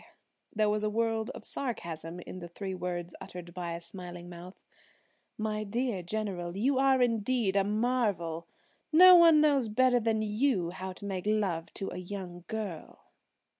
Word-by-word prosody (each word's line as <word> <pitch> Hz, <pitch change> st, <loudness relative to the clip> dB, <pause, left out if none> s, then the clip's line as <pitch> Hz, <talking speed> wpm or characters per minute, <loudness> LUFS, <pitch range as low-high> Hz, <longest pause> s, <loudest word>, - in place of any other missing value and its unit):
There 215 Hz, -1 st, +1 dB
was 210 Hz, 0 st, 0 dB
a 215 Hz, -, +1 dB
world 225 Hz, +1 st, 0 dB
of -, -, -10 dB
sarcasm 170 Hz, -, -4 dB
in 185 Hz, -, -8 dB
the 175 Hz, -, -7 dB
three 190 Hz, +3 st, -5 dB
words 175 Hz, -1 st, -4 dB
uttered 175 Hz, -1 st, -9 dB
by 175 Hz, -1 st, -4 dB
a 170 Hz, -, -4 dB
smiling 175 Hz, 0 st, -9 dB
mouth. 175 Hz, +2 st, -11 dB, 0.8 s
"My 215 Hz, 0 st, -2 dB
dear 225 Hz, -1 st, -2 dB
General, 180 Hz, -2 st, -4 dB
you 260 Hz, +5 st, +2 dB
are 265 Hz, -1 st, +4 dB
indeed 230 Hz, -3 st, +1 dB
a 200 Hz, -, +4 dB
marvel! 205 Hz, -7 st, 0 dB, 0.4 s
No 365 Hz, +4 st, +9 dB
one 330 Hz, -3 st, +7 dB
knows 280 Hz, -5 st, +3 dB
better 245 Hz, +3 st, +3 dB
than 220 Hz, -1 st, 0 dB
you 210 Hz, -5 st, +1 dB
how 185 Hz, +1 st, -6 dB
to 200 Hz, -, -10 dB
make 195 Hz, -1 st, -4 dB
love 195 Hz, -6 st, 0 dB
to 195 Hz, -, -3 dB
a -, -, -6 dB
young 180 Hz, -1 st, -7 dB
girl." 210 Hz, -7 st, -6 dB
205 Hz, 165 wpm, -30 LUFS, 175-230 Hz, 0.8 s, No